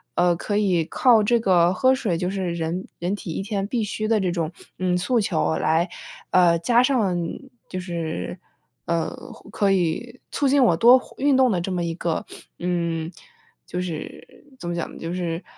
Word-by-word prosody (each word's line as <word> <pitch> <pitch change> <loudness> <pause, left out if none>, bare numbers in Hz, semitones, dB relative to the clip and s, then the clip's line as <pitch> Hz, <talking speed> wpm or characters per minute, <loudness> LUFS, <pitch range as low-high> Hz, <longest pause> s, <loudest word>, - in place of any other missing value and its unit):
呃， 175 -1 +3
可 205 +4 -2
以 185 -5 +2
靠 230 +4 +4
这 235 +3 +3
个 180 -4 +3
喝 260 +7 +3
水 195 -9 -1
就 180 - -1
是 190 -3 -2
人 170 +3 -3
人 180 +4 -1
体 190 -4 -7
一 - - -3
天 200 -1 -2
必 230 +1 -1
须 215 +1 -3
的 225 -1 +3
这 185 -3 0
种， 165 -2 -2 0.3
嗯， 185 -1 +1
诉 235 +7 +1
求 160 -5 0
来， 165 +3 +1 0.4
呃， 175 -2 +5
加 235 +8 +3
上 225 -9 +2
你 175 +11 -5 0.2
就 185 - -4
是， 170 -1 -4 0.5
呃， 170 -1 0 0.4
可 200 -2 +1
以 195 +7 -1
促 285 - +1
进 280 +1 +4
我 195 -9 +4
多 245 +7 +7
活 - - -16
运 280 0 +3
动 260 -1 +5
的 185 - +1
这 190 - -3
么 180 -1 -1
一 165 -1 -3
个， 170 -1 -2 0.4
嗯， 170 -2 -2 0.5
就 180 - -4
是 170 - -8
怎 175 - -5
么 175 - -2
讲 170 - -4
呢， - - -11
就 165 - -5
是， 175 -1 -3
180 Hz, 210 characters per minute, -23 LUFS, 170-215 Hz, 0.5 s, 多